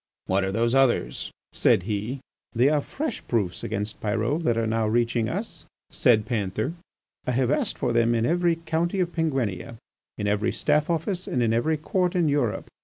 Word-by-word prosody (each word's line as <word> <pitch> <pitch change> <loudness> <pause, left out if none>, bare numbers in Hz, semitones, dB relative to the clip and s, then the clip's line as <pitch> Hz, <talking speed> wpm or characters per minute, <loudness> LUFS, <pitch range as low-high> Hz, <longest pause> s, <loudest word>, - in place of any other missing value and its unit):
"What 95 +1 +1
are 95 - -1
those 115 +3 +1
others?" 125 - +2 0.2
said 90 - +3
he. 110 +6 -3 0.3
"They 125 +3 +4
are 150 -1 +2
fresh 280 - -4
proofs 100 -7 -1
against 105 +2 -3
Pyrot 115 +9 0
that 115 -1 +2
are 115 - +1
now 110 0 0
reaching 115 0 +1
us," - - -5 0.3
said 110 -4 +3
Panther. 110 - -2 0.5
"I 125 - +1
have 130 +1 +1
asked 150 - 0
for 120 - 0
them 115 0 +3
in 115 0 +1
every 175 +3 +2
county 165 +3 -1
of 175 -2 0
Penguinia, 130 - -1 0.4
in 105 - -3
every 105 +2 +1
Staff 150 +1 +1
Office 175 +3 -1
and 125 - 0
in 115 -1 +2
every 155 +8 +1
Court 180 +4 0
in 175 -3 +3
Europe. 140 -7 0
120 Hz, 180 wpm, -25 LUFS, 110-155 Hz, 0.5 s, They